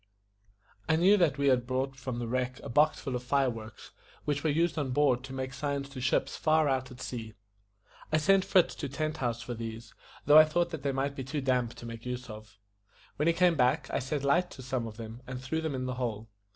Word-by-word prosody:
I 160 - +5
knew 185 +5 +5
that 160 -7 +2
we 140 0 +3
had 125 -2 +2
brought 130 +1 -1
from 130 -2 -5
the 120 -1 -3
wreck 125 +1 -2
a - - -6
box 150 +6 +3
full 135 -3 -4
of 125 - -2
fire 135 +1 +1
works, 110 -1 -10 0.3
which 145 -1 -1
were 160 - +2
used 165 +2 +1
on 140 -3 -1
board 130 -3 +3
to 135 - -10
make 130 0 -4
signs 140 0 -3
to 135 -2 -8
ships 130 +1 +1
far 155 -1 +3
out 130 -2 0
at 125 -1 -12
sea. 115 -4 -6 0.8
I 155 - +4
sent 190 +5 +4
Fritz 185 -2 +3
to 140 - -5
Tent 155 +3 -2
House 120 -3 -2
for 120 - -5
these, 115 0 -7 0.3
though 150 +2 +9
I 155 - +9
thought 170 +2 0
that 160 -4 -5
they 140 0 0
might 135 +1 -1
be 135 - -4
too 135 +3 -3
damp 125 -3 0
to - - -10
make 115 0 -8
use 125 -1 -5
of. 110 -1 -12 0.6
When 150 - +1
he 170 - +5
came 180 0 +4
back, 125 -5 +1
I - - 0
set 135 +2 -3
light 175 +6 +2
to 130 - -10
some 125 -2 -2
of 110 -1 -9
them, 115 +1 -8
and 130 -1 -5
threw 130 +5 -2
them 160 -4 -2
in 130 0 -3
the 130 - -2
hole. 115 -4 -4
130 Hz, 245 wpm, -30 LUFS, 125-150 Hz, 0.8 s, though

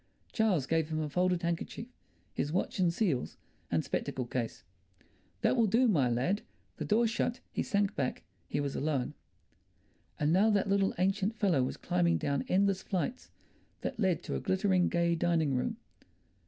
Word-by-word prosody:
Charles 205 - +2
gave 160 +1 0
him 155 -1 -1
a 155 - -1
folded 180 +3 +1
handkerchief, 170 +7 -3 0.5
his 145 - -2
watch 185 +3 -1
and 175 -2 +4
seals, 170 - -1 0.3
and - - +1
spectacle 130 - -2
case. 120 -1 -4 0.8
"That - - +3
will 230 -3 +3
do, 235 +5 +4
my 145 - +3
lad." 130 - 0 0.4
The - - -3
door 225 +3 +3
shut, 235 +2 -1
he - - -1
sank 200 0 0
back, 130 - -2 0.2
he - - -2
was 140 -1 -2
alone.... 140 -3 -1 1.1
And 150 +2 +2
now 200 +5 +5
that 205 -1 +2
little 195 0 +2
ancient 195 +4 +1
fellow 180 -11 +2
was 125 - -2
climbing 85 -2 +1
down 140 - -1
endless 195 0 +2
flights 210 +7 -3 0.5
that - - -4
led 185 -6 +1
to - - -4
a - - -1
glittering, 190 -1 +2
gay 170 0 +2
dining 165 -3 +1
room. 125 - -1
175 Hz, 170 wpm, -31 LUFS, 145-200 Hz, 1.1 s, now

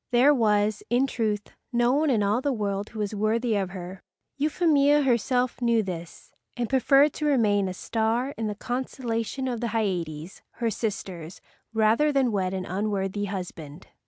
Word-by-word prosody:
There 255 +4 +5
was, 210 -4 +2
in 245 +3 +3
truth, 215 -5 -2 0.2
no 240 0 +3
one 300 +2 +2
in 225 -6 +2
all 210 +5 +1
the 285 - 0
world 205 -3 -2
who 225 - -11
was 210 -1 -2
worthy 220 +2 0
of 195 -2 -1
her. 185 0 -8 0.3
Euphemia 295 -1 +3
herself 250 0 +1
knew 235 -2 +3
this 170 -3 -8 0.2
and 240 -1 -1
preferred 275 +3 +4
to 300 - -2
remain 210 -8 +3
a - - -4
star 230 +7 -1
in 220 -1 -3
the 210 - -3
constellation 245 +1 -3
of 245 -2 -3
the 240 - 0
Hyades, 175 -5 -3
her 230 -1 -1
sisters, 190 -6 -5 0.3
rather 225 +7 +3
than 270 -4 +2
wed 190 -3 0
an 190 -1 -3
unworthy 200 +1 -2
husband. 180 -5 -7
220 Hz, 165 wpm, -26 LUFS, 200-250 Hz, 0.3 s, There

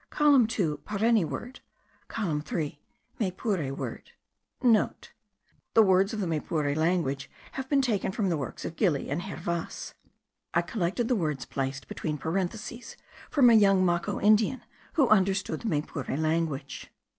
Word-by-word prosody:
COLUMN 285 -6 +5
2: 180 -10 -1
PARENI 215 0 +2
WORD. 195 - -6 0.5
COLUMN 165 -9 -2
3: 150 -2 -4 0.4
MAYPURE 185 - -1
WORD. - - -6 0.3
(* - - -52
The 225 -1 0
words 190 0 +4
of 220 - -4
the 195 - 0
Maypure 150 -3 -1
language 155 -4 0 0.2
have 265 0 -6
been 280 -2 +3
taken 215 -7 0
from 195 -1 0
the 170 - +1
works 140 -5 -5
of 165 - -5
Gili 160 -10 +1
and 150 +5 -1
Hervas. 170 -3 -4 0.6
I 170 - +4
collected 195 +5 -1
the 250 - +2
words 150 - -2
placed 135 0 -4
between 150 -2 -3
parentheses 195 - -4 0.3
from 255 -5 +6
a - - +6
young 195 -3 +5
Maco 175 +3 0
Indian, 215 +4 +3 0.3
who 285 -6 +4
understood 195 -5 +2
the - - -4
Maypure 145 -4 -2
language.) 155 -2 -2
185 Hz, 145 wpm, -28 LUFS, 155-220 Hz, 0.6 s, from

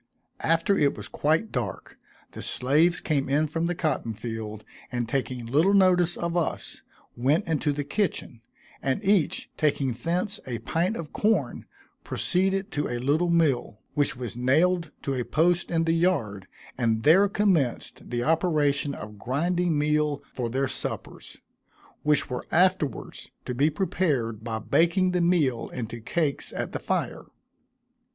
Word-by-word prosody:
After 165 +4 +2
it 145 -6 +2
was - - -7
quite 160 +9 0
dark, 115 -8 -5 0.3
the - - -8
slaves 155 +7 +2
came 140 -4 -1
in 145 +3 +3
from 165 +2 -1
the 175 - -1
cotton 155 -9 -1
field, 110 -1 -6 0.3
and 120 -2 -2
taking 125 -1 -2
little 155 +12 +3
notice 180 -3 +4
of 170 0 -2
us, 170 -2 -2 0.3
went 145 - +1
into 155 -2 +1
the 145 0 -2
kitchen, 145 - -2 0.4
and 135 -1 -1
each 195 -5 +1
taking 140 -4 +1
thence 180 - -1
a 120 -2 -2
pint 165 - -1
of 160 -3 -7
corn, 205 - 0 0.4
proceeded 195 +2 0
to 145 - -1
a 120 - -2
little 145 +8 +1
mill, 155 -10 +1 0.2
which 145 -3 +1
was 120 -2 -5
nailed 160 +7 +2
to 140 - -1
a 125 -2 -1
post 175 +6 +1
in 165 -1 +1
the 165 0 +2
yard, 125 - 0 0.3
and 115 -2 +1
there 190 +7 +6
commenced 185 - 0
the 120 0 -1
operation 150 -3 +1
of 105 -1 -9
grinding 170 - 0
meal 150 0 +1
for 120 -2 -2
their 135 +3 0
suppers, - - -5 0.6
which 150 -1 +2
were 125 - -5
afterwards 180 -6 0 0.2
to 125 - -3
be 140 +5 +3
prepared 140 - -1
by 115 -1 -3
baking 170 - +2
the 180 -1 +1
meal 150 -10 +1
into 120 -1 -6
cakes 150 +4 -1
at - - -3
the - - -3
fire. - - -2
150 Hz, 150 wpm, -26 LUFS, 125-175 Hz, 0.6 s, there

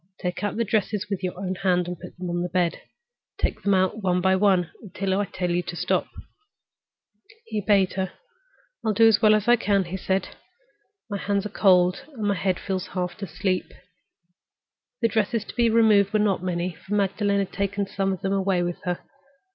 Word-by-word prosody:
Take 180 +2 -3
out 205 - -1
the 230 - +2
dresses 210 -1 0
with 195 - -2
your 180 -1 -3
own 190 -1 -2
hand 180 -2 +1
and 180 - -3
put 175 - -12
them 180 0 -5
on 175 0 -1
the 180 - -2
bed. 175 -2 0 0.6
Take - - -1
them 200 -1 +2
out 185 +3 +1
one 180 -2 +1
by 190 +1 +3
one 190 -3 +2
until 195 -2 -3
I 205 - +1
tell 180 -2 -3
you 175 +1 +1
to 175 0 -7
stop." - - 0 1.4
He 215 - -3
obeyed 195 -2 +3
her. 190 -1 -2 0.7
"I'll 220 - +1
do 225 +2 +6
it - - +8
as 215 0 +3
well 215 -1 +6
as 215 0 -1
I 240 0 +6
can," 200 -3 +2
he 180 +2 -5
said. 190 +1 -1 0.8
"My 205 -3 -3
hands 200 0 -1
are - - -3
cold, 185 -3 +3
and 225 -5 -6
my 205 -1 +2
head 185 -1 -1
feels 190 -1 -3
half 180 +3 -3
asleep." 185 0 -2 1.3
The - - +6
dresses 220 0 0
to - - -9
be 235 -1 +3
removed 215 -3 +4
were - - +4
not 205 -3 +1
many, 180 0 -2
for 190 +5 -5
Magdalen 200 0 +1
had 195 -1 -2
taken 200 0 -1
some 195 0 -1
of 190 - -4
them 195 0 -1
away 190 -2 +1
with 175 0 -4
her. 180 -1 -2
195 Hz, 205 wpm, -25 LUFS, 180-205 Hz, 1.4 s, it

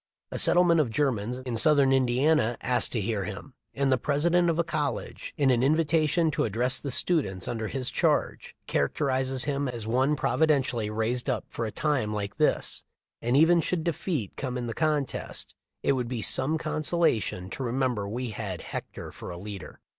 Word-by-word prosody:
A - - -3
settlement 175 -2 +5
of 135 - -1
Germans 125 -3 -1
in 125 -2 -4
southern 140 0 +5
Indiana 130 0 +2
asked 125 -2 +1
to 120 - 0
hear 105 -1 -1
him; 105 +7 -8 0.2
and 140 -1 +1
the 130 - +3
president 170 +6 +2
of 165 - 0
a 170 - +2
college, 155 -3 -3
in 140 -3 +3
an 120 -1 +2
invi 155 +5 +3
tation 155 +1 +2
to - - 0
address 125 +5 0
the 140 - -5
students 125 - 0
under 115 -2 -3
his 130 0 -2
charge, - - 0
characterizes 130 - 0
him 140 -1 -1
as 120 -3 -5
"one 130 +6 +2
providentially 135 -9 +1
raised 115 +5 -1
up 125 -4 -1
for 115 - -4
a - - -5
time 130 -8 -1
like 100 -1 -4
this, - - 0 0.4
and 120 +3 +1
even 165 +3 +5
should 170 0 -1
defeat 160 - -2
come 130 -2 -4
in 125 - -3
the 115 - -4
contest, 150 -2 -2 0.3
it - - +3
would 125 -3 -1
be 120 -3 -3
some 150 +5 +2
consolation 155 - 0
to - - -5
remem 130 +1 0
ber 100 -3 -4
we 120 +2 -3
had 100 -6 -5
Hector - - -7
for - - -9
a 90 - -6
leader." 100 +1 -9
130 Hz, 185 wpm, -27 LUFS, 115-150 Hz, 0.4 s, settlement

